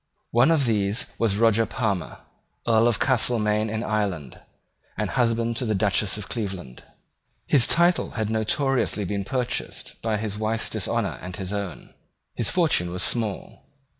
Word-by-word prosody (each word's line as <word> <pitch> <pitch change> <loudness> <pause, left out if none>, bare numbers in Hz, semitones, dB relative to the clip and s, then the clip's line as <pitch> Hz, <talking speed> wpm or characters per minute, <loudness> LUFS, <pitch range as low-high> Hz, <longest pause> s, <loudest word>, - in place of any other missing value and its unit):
One 120 +6 +4
of 155 -5 +3
these 105 +1 +1
was 110 -4 +1
Roger 115 0 +3
Palmer, 95 - -3 0.5
Earl 115 0 +4
of 120 -3 +2
Castelmaine 110 -4 +1
in 110 +2 -3
Ireland, 100 - -3 0.6
and - - -2
husband 115 -1 0
of 125 - -2
the 110 - 0
Duchess 100 0 +1
of 105 - -6
Cleveland. 95 - -5 0.6
His 135 -5 +5
title 175 +1 +3
had 110 -1 -1
notoriously 110 0 +1
been 100 +1 -2
purchased 125 +4 -3
by 110 -1 -1
his 105 -1 -4
wife's 110 +1 0
dishonour - - -2
and 90 0 -7
his 95 0 -5
own. 100 -5 -6 0.4
His 115 - 0
fortune 155 - +2
was 90 - -1
small. 110 -5 -2
110 Hz, 150 wpm, -24 LUFS, 100-115 Hz, 0.6 s, His